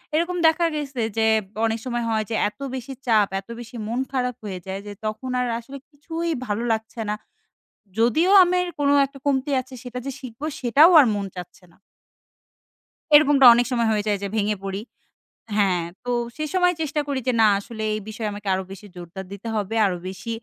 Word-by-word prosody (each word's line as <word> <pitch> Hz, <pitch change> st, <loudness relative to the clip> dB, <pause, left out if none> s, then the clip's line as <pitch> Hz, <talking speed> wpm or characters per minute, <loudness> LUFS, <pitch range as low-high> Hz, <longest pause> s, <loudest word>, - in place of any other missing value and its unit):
এরকম 345 Hz, +3 st, 0 dB
দেখা 320 Hz, +2 st, +3 dB
গেছে 275 Hz, -5 st, -3 dB, 0.2 s
যে 220 Hz, -, +3 dB, 0.4 s
অনেক 225 Hz, 0 st, -1 dB
সময় 240 Hz, -1 st, -2 dB
হয়, 220 Hz, -1 st, +1 dB
যে 225 Hz, -, -1 dB
এত 270 Hz, -, -26 dB, 0.2 s
বেশি 260 Hz, +1 st, -6 dB
চাপ, 215 Hz, -4 st, +4 dB
এত 195 Hz, -, -15 dB
বেশি 240 Hz, +1 st, -10 dB
মন 235 Hz, +3 st, -2 dB
খারাপ 250 Hz, -3 st, -1 dB
হয়ে 190 Hz, -3 st, -5 dB
যায় 190 Hz, +1 st, -4 dB
যে 205 Hz, -, -6 dB
তখন 215 Hz, +4 st, -4 dB
আর 250 Hz, -, 0 dB
আসলে 270 Hz, +4 st, -10 dB
কিছুই 325 Hz, +4 st, -4 dB, 0.2 s
ভালো 210 Hz, +2 st, -2 dB
লাগছে 225 Hz, +1 st, -3 dB
না। 210 Hz, -, 0 dB, 0.8 s
যদিও 315 Hz, +11 st, +3 dB
আমার 360 Hz, 0 st, +1 dB
কোন 285 Hz, -1 st, +2 dB, 0.2 s
একটা 275 Hz, 0 st, -13 dB
কমতি 280 Hz, 0 st, +1 dB
আছে, 260 Hz, +1 st, -16 dB
সেটা 250 Hz, 0 st, -6 dB
যে 275 Hz, -, -3 dB
শিখবো 255 Hz, +2 st, -8 dB
সেটাও 275 Hz, +7 st, +6 dB
আর 280 Hz, -, +7 dB
মন 200 Hz, -1 st, -2 dB
চাচ্ছে 180 Hz, +1 st, -10 dB
না। -, -, -25 dB, 1.4 s
এরকমটা 290 Hz, -3 st, +7 dB
অনেক 240 Hz, 0 st, +2 dB
সময় 235 Hz, -2 st, +1 dB
হয়ে 210 Hz, -1 st, 0 dB
যায় 205 Hz, -, +1 dB
যে 200 Hz, -, -2 dB
ভেঙে 210 Hz, 0 st, +1 dB
পড়ি 195 Hz, +1 st, -3 dB, 0.8 s
হ্যাঁ, 190 Hz, -4 st, +2 dB, 0.2 s
তো 245 Hz, -, -6 dB, 0.3 s
সে 310 Hz, -, -3 dB
সময় 360 Hz, -1 st, +3 dB
চেষ্টা 300 Hz, 0 st, -1 dB
করি 280 Hz, -2 st, -1 dB
যে -, -, +4 dB
না -, -, +7 dB
আসলে 220 Hz, +1 st, -7 dB
এই 215 Hz, -, -2 dB
বিষয়ে 215 Hz, 0 st, -4 dB
আমাকে 205 Hz, 0 st, -9 dB
আরো 190 Hz, 0 st, -1 dB
বেশি 195 Hz, +1 st, -10 dB
জোরদার 180 Hz, +2 st, -8 dB
দিতে 200 Hz, +3 st, -8 dB
হবে। 210 Hz, +1 st, -2 dB
আরো 185 Hz, -2 st, 0 dB
বেশি 190 Hz, +5 st, -7 dB
235 Hz, 195 wpm, -23 LUFS, 210-280 Hz, 1.4 s, আর